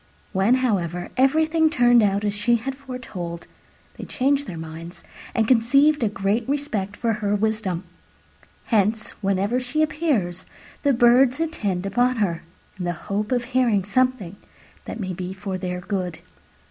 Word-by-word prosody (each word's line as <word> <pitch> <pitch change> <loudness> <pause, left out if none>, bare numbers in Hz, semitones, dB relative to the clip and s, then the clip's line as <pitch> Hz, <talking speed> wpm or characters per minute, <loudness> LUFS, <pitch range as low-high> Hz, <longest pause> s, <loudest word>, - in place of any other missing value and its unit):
When, 195 +6 +3
however, 180 -6 -1
everything 315 +4 +3
turned 245 -4 +5
out 200 0 +1
as 205 - 0
she 210 +4 +2
had 255 +4 -3
foretold, 250 -11 -7 0.5
they - - -7
changed 280 +2 0
their 170 - -6
minds 165 +2 -9 0.3
and 225 -2 +2
conceived 275 +5 +4
a 225 - +2
great 205 +4 -1
respect 220 -9 -2
for 230 -1 0
her 205 0 +1
wisdom. 205 -4 -1 0.8
Hence, 215 0 +1
whenever 200 +4 +1
she 255 +5 0
appears, 275 - -1 0.3
the 285 - +3
Birds 250 +2 +4
attend 205 - -2
upon 245 +5 +2
her 190 -7 -1 0.4
in 180 - -3
the 175 - 0
hope 205 +6 -4
of 245 -1 +1
hearing 240 -5 +1
something 215 -3 0 0.5
that 225 - -6
may 185 -3 -3
be 180 +1 -5
for 190 -1 -5
their 180 -1 -4
good. 180 -3 -3
215 Hz, 150 wpm, -23 LUFS, 190-255 Hz, 0.8 s, turned